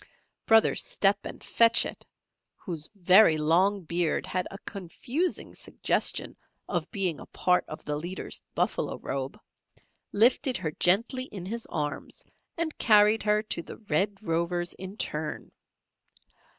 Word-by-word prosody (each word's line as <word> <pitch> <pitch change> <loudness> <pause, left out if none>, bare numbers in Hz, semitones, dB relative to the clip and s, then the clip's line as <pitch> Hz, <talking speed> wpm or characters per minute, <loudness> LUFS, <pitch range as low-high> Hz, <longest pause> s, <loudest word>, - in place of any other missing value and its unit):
Brother 225 0 +5
Step 195 0 +2
and - - -8
Fetch 230 0 +4
It, - - -8 0.5
whose 165 -6 -5
very 185 -2 +6
long 180 +6 +2
beard 170 0 -1
had 185 0 -2
a 195 - -9
confusing 230 - -4
suggestion - - -1 0.3
of - - -2
being 190 -7 0
a - - -11
part 180 0 +1
of 155 - -9
the 150 - -2
leader's 175 +5 -4
buffalo - - -1
robe, 135 0 -5 0.7
lifted 245 +4 +3
her 165 -5 -3
gently 230 - +2
in 195 -8 -8
his 230 +4 -5
arms 150 -3 -5 0.3
and 330 -2 -2
carried 215 0 +5
her 210 0 +1
to 200 -5 -3
the - - -10
Red 205 -1 -1
Rovers 175 0 -1
in 190 +2 -9
turn. 150 -5 -3
190 Hz, 135 wpm, -27 LUFS, 170-215 Hz, 0.7 s, very